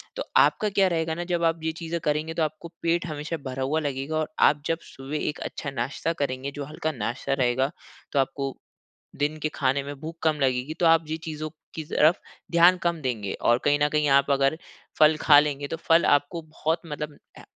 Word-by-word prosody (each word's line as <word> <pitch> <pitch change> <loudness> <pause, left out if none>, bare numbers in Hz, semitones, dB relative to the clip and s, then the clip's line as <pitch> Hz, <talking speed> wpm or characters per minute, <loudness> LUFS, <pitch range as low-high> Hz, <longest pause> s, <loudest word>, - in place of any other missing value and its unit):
तो - - -3
आपका 215 - +4
क्या 195 -1 +3
रहेगा 165 -2 0
ना 175 - -3
जब 170 -1 0
आप 165 0 +2
ये 160 - 0
चीज़ें 165 +1 -3
करेंगे, 155 +2 -1
तो 165 - 0
आपको 155 +2 -4
पेट 170 +1 +1
हमेशा 155 +2 -4
भरा 130 +1 -3
हुआ 150 +4 0
लगेगा 145 +1 -3
और 155 -1 -1 0.2
आप 145 0 -2
जब 165 +1 0
सुबह 135 +3 -7
एक 150 - -6
अच्छा 145 - -6
नाश्ता 135 +6 -2
करेंगे, 130 +1 -3
जो 145 0 -6
हल्का 155 +2 -3
नाश्ता 120 +2 -3
रहेगा, 130 +1 +1 0.4
तो 140 - +1
आपको, 135 0 -1 0.6
दिन 145 +2 0
के 155 0 -1
खाने 135 0 +1
में 145 +1 -6
भूख 160 +2 -7
कम 155 -2 +1
लगेगी, 130 +3 0
तो 175 0 +1
आप 165 0 +5
जी 160 +1 -3
चीज़ों 155 -1 -5 0.2
की 160 - -5
तरफ 155 +3 +3 0.3
ध्यान 170 +2 +6
कम 170 -2 0
देंगे। 110 -7 -2
और 120 +1 +3
कहीं 145 0 +3
न 150 - +4
कहीं 150 -1 +1
आप 140 +1 +4
अगर 135 +2 +3 0.4
फल 155 0 +6
खा 145 -2 +7
लेंगे, 145 -1 -2
तो 165 - -3
फल 165 +1 +3
आपको 145 +4 +2
बहुत 160 +1 -2
मतलब 150 -1 -6 0.2
अ, - - -12
150 Hz, 210 wpm, -25 LUFS, 140-160 Hz, 0.6 s, खा